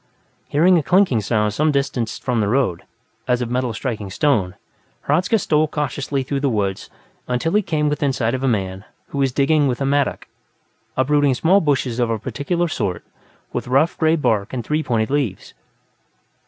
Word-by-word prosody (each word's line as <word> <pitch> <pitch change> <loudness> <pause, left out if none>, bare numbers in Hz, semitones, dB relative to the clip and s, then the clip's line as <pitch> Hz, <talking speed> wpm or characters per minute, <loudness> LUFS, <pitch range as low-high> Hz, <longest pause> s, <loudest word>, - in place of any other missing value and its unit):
Hearing 170 +4 +4
a - - 0
clinking 175 - +3
sound 105 0 0
some 155 +7 +2
distance 135 -5 -1
from 125 -3 -1
the 105 - +1
road, 110 -7 0 0.4
as 125 -1 +2
of 120 -1 -3
metal 125 -1 0
striking 110 -3 -4
stone, 100 - +1 0.5
Hradzka 185 +5 +2
stole 155 -5 +1
cautiously 145 -2 -2
through 140 +1 -2
the 140 0 +1
woods 100 -5 -2 0.4
until 125 +6 -1
he 210 - +4
came 155 -5 -1
within 145 -1 0
sight 120 -2 -1
of 130 - -2
a - - +2
man 95 -5 -1 0.3
who 140 - -4
was 135 -2 +2
digging 145 +3 +2
with 125 -2 -1
a 135 - -1
mattock, 140 0 0 0.7
uprooting 140 0 +3
small 185 +9 +3
bushes 135 -5 0
of 120 -1 +1
a 115 - 0
particular 170 - -2
sort, 95 - -3 0.5
with - - -3
rough 135 +6 +2
gray 160 0 +2
bark 110 -10 0
and 120 -3 -4
three 150 +1 0
pointed 115 -5 -1
leaves. 135 -10 -2
135 Hz, 180 wpm, -20 LUFS, 115-150 Hz, 0.7 s, Hearing